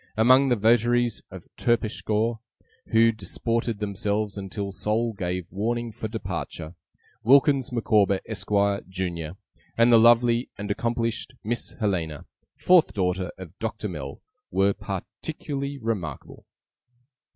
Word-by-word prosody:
Among 130 Hz, +5 st, +6 dB
the 120 Hz, -, +4 dB
votaries 120 Hz, +1 st, +2 dB
of -, -, -10 dB
TERPSICHORE, 115 Hz, -1 st, 0 dB, 0.5 s
who 115 Hz, 0 st, +5 dB
disported 115 Hz, +2 st, -2 dB
themselves 105 Hz, 0 st, -2 dB
until 100 Hz, 0 st, -4 dB
Sol 110 Hz, +4 st, 0 dB
gave 90 Hz, -2 st, -3 dB
warning 115 Hz, +5 st, -2 dB
for 110 Hz, -, -5 dB
departure, 90 Hz, -6 st, -5 dB, 0.5 s
Wilkins 135 Hz, +1 st, +4 dB
Micawber, 105 Hz, -4 st, +2 dB
Esquire, 100 Hz, -1 st, 0 dB
Junior, 90 Hz, -3 st, -3 dB, 0.4 s
and 115 Hz, +1 st, +5 dB
the 115 Hz, -, +8 dB
lovely 120 Hz, +1 st, +4 dB
and 105 Hz, 0 st, -4 dB
accomplished 115 Hz, +3 st, -2 dB
Miss 120 Hz, +3 st, -3 dB
Helena, 85 Hz, -, -2 dB, 0.3 s
fourth 180 Hz, -2 st, +4 dB
daughter 90 Hz, -1 st, 0 dB
of 90 Hz, -2 st, -10 dB
Doctor 110 Hz, -1 st, -3 dB
Mell, 75 Hz, -7 st, -7 dB, 0.3 s
were 100 Hz, +1 st, +2 dB
particularly 140 Hz, -, -5 dB
remarkable. 100 Hz, -, -5 dB
110 Hz, 115 wpm, -25 LUFS, 95-120 Hz, 0.5 s, the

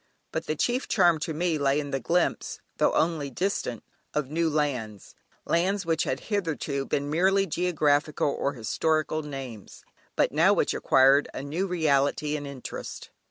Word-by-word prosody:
But -, -, -4 dB
the 155 Hz, -, -1 dB
chief 245 Hz, -, 0 dB
charm 170 Hz, -2 st, +4 dB
to 160 Hz, -, -3 dB
me 160 Hz, 0 st, 0 dB
lay 140 Hz, +1 st, +2 dB
in 145 Hz, -1 st, -5 dB
the 135 Hz, -, -1 dB
glimpse, 170 Hz, +7 st, 0 dB, 0.2 s
though -, -, +3 dB
only 160 Hz, -4 st, +1 dB
distant, 135 Hz, -, -2 dB, 0.3 s
of 150 Hz, -2 st, -1 dB
new 165 Hz, +1 st, +1 dB
lands, 125 Hz, -9 st, -2 dB, 0.3 s
lands 190 Hz, +3 st, +1 dB
which 165 Hz, -1 st, +1 dB
had -, -, -2 dB
hitherto 160 Hz, -9 st, -2 dB
been 145 Hz, 0 st, -1 dB
merely 190 Hz, +4 st, +3 dB
geographical 155 Hz, -4 st, +1 dB
or 140 Hz, -, -1 dB
historical 155 Hz, +6 st, 0 dB
names, 135 Hz, -8 st, -8 dB, 0.3 s
but -, -, +2 dB
which -, -, -12 dB
now -, -, +5 dB
acquired 135 Hz, +2 st, +4 dB
a -, -, -4 dB
new 165 Hz, +7 st, -2 dB
reality 150 Hz, -3 st, +1 dB
and 145 Hz, -1 st, -5 dB
interest. 140 Hz, -3 st, -7 dB
150 Hz, 160 wpm, -27 LUFS, 140-170 Hz, 0.3 s, now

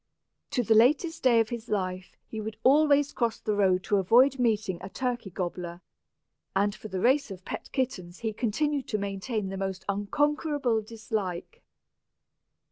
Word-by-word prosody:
To 250 Hz, -, 0 dB
the 220 Hz, -, +3 dB
latest 300 Hz, +9 st, +3 dB
day 240 Hz, -3 st, +5 dB
of 220 Hz, -, -2 dB
his 235 Hz, -1 st, -6 dB
life 185 Hz, -2 st, -3 dB
he 220 Hz, -, -6 dB
would 215 Hz, 0 st, -6 dB
always 290 Hz, +1 st, +4 dB
cross 235 Hz, -2 st, -1 dB
the 215 Hz, -, -1 dB
road 190 Hz, -2 st, +2 dB
to 205 Hz, -, +1 dB
avoid 250 Hz, +8 st, +4 dB
meeting 215 Hz, -6 st, +1 dB
a -, -, -7 dB
turkey 245 Hz, -3 st, -3 dB
gobbler, 175 Hz, -1 st, -5 dB, 0.8 s
and 200 Hz, +1 st, +2 dB
for 210 Hz, -, -9 dB
the 190 Hz, -2 st, -4 dB
race 265 Hz, +5 st, +3 dB
of 190 Hz, -2 st, -9 dB
pet -, -, -6 dB
kittens 185 Hz, -9 st, -3 dB
he 220 Hz, -2 st, -2 dB
continued 270 Hz, +5 st, -1 dB
to 215 Hz, -, -1 dB
maintain 200 Hz, +1 st, -3 dB
the 195 Hz, -, -5 dB
most 190 Hz, -1 st, -4 dB
unconquerable 285 Hz, +4 st, 0 dB
dislike. 220 Hz, -, -5 dB
220 Hz, 160 wpm, -28 LUFS, 195-255 Hz, 0.8 s, day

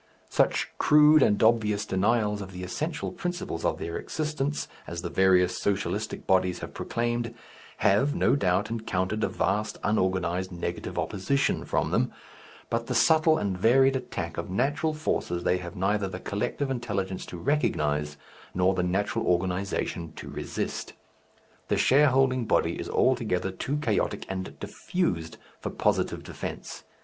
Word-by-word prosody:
Such -, -, +2 dB
crude 150 Hz, 0 st, +6 dB
and 105 Hz, -4 st, +3 dB
obvious 105 Hz, -2 st, +3 dB
denials 105 Hz, +1 st, +1 dB
of 95 Hz, -1 st, -8 dB
the 90 Hz, 0 st, -6 dB
essential 150 Hz, -, -3 dB
principles 175 Hz, -, -4 dB
of -, -, +1 dB
their 85 Hz, -, -4 dB
existence 150 Hz, -2 st, -2 dB, 0.2 s
as 85 Hz, 0 st, -5 dB
the 85 Hz, -, -4 dB
various 95 Hz, -1 st, +3 dB
Socialistic 100 Hz, +2 st, -2 dB
bodies 95 Hz, -2 st, +2 dB
have -, -, -8 dB
proclaimed 120 Hz, 0 st, -2 dB, 0.4 s
have, 105 Hz, +9 st, +3 dB
no -, -, +3 dB
doubt, 100 Hz, -3 st, +1 dB
encountered 110 Hz, -2 st, -1 dB
a -, -, +3 dB
vast, 105 Hz, +1 st, -1 dB
unorganized, 95 Hz, -3 st, 0 dB
negative 85 Hz, 0 st, -4 dB
opposition 110 Hz, +8 st, 0 dB
from -, -, 0 dB
them, -, -, +1 dB, 0.6 s
but 115 Hz, 0 st, -1 dB
the 125 Hz, -, -2 dB
subtle 155 Hz, +5 st, +5 dB
and 100 Hz, -2 st, -1 dB
varied 135 Hz, +8 st, +4 dB
attack 90 Hz, -11 st, -4 dB
of 85 Hz, -, -5 dB
natural 145 Hz, +10 st, 0 dB
forces 90 Hz, -, -1 dB
they 90 Hz, -, +2 dB
have 85 Hz, +2 st, -8 dB
neither 100 Hz, +2 st, +1 dB
the 95 Hz, -, -6 dB
collective 135 Hz, +7 st, -2 dB
intelligence 100 Hz, -7 st, -2 dB
to 90 Hz, -, -7 dB
recognize, 75 Hz, -, 0 dB, 0.4 s
nor 90 Hz, +1 st, +3 dB
the 95 Hz, -, 0 dB
natural 95 Hz, +3 st, 0 dB
organization 90 Hz, -2 st, -1 dB
to -, -, -9 dB
resist. -, -, -4 dB, 0.7 s
The -, -, +1 dB
shareholding 130 Hz, -2 st, +4 dB
body -, -, +2 dB
is -, -, -5 dB
altogether 110 Hz, -7 st, +1 dB
too 135 Hz, +10 st, -3 dB
chaotic 120 Hz, -8 st, -1 dB
and 95 Hz, -1 st, -5 dB
diffused 85 Hz, -, -2 dB, 0.2 s
for -, -, -4 dB
positive -, -, 0 dB
defence. -, -, -7 dB
105 Hz, 145 wpm, -27 LUFS, 90-130 Hz, 0.7 s, crude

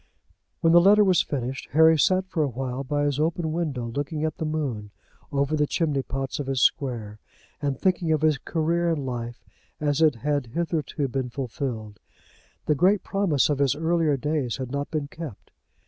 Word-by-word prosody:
When 165 Hz, -1 st, +4 dB
the 175 Hz, -, +8 dB
letter 205 Hz, +3 st, +6 dB
was 185 Hz, -4 st, +4 dB
finished 130 Hz, -2 st, -4 dB
Harry 160 Hz, +1 st, +6 dB
sat 185 Hz, +5 st, +3 dB
for 170 Hz, -3 st, -1 dB
a 150 Hz, -, +2 dB
while 130 Hz, +1 st, -4 dB
by 145 Hz, +2 st, -1 dB
his 145 Hz, -1 st, 0 dB
open 160 Hz, +1 st, 0 dB
window 155 Hz, -7 st, -2 dB
looking 145 Hz, +6 st, -3 dB
at 155 Hz, -1 st, -2 dB
the 160 Hz, -, -3 dB
moon, 135 Hz, -10 st, -3 dB, 0.4 s
over 140 Hz, +1 st, +1 dB
the 150 Hz, -1 st, +1 dB
chimney 150 Hz, -5 st, 0 dB
pots 135 Hz, +1 st, -4 dB
of 140 Hz, -, -4 dB
his 135 Hz, -1 st, 0 dB
square, 115 Hz, -6 st, 0 dB, 0.4 s
and 140 Hz, -3 st, -1 dB
thinking 180 Hz, -3 st, +1 dB
of 155 Hz, -2 st, +2 dB
his 155 Hz, -3 st, +3 dB
career 170 Hz, +3 st, 0 dB
in 150 Hz, -5 st, -1 dB
life 120 Hz, -2 st, -5 dB, 0.3 s
as 145 Hz, 0 st, 0 dB
it 155 Hz, -4 st, +5 dB
had 145 Hz, +1 st, -1 dB
hitherto 155 Hz, +1 st, -2 dB
been 130 Hz, -1 st, -3 dB
fulfilled. 120 Hz, -4 st, -5 dB, 0.7 s
The 150 Hz, -, +3 dB
great 185 Hz, +7 st, +3 dB
promise 195 Hz, -9 st, +1 dB
of 145 Hz, -2 st, -1 dB
his 140 Hz, -1 st, +2 dB
earlier 160 Hz, -2 st, +1 dB
days 145 Hz, -3 st, -1 dB
had 130 Hz, -2 st, -5 dB
not 140 Hz, 0 st, -3 dB
been 150 Hz, -3 st, -2 dB
kept. 150 Hz, -7 st, -9 dB
145 Hz, 185 wpm, -25 LUFS, 130-160 Hz, 0.7 s, the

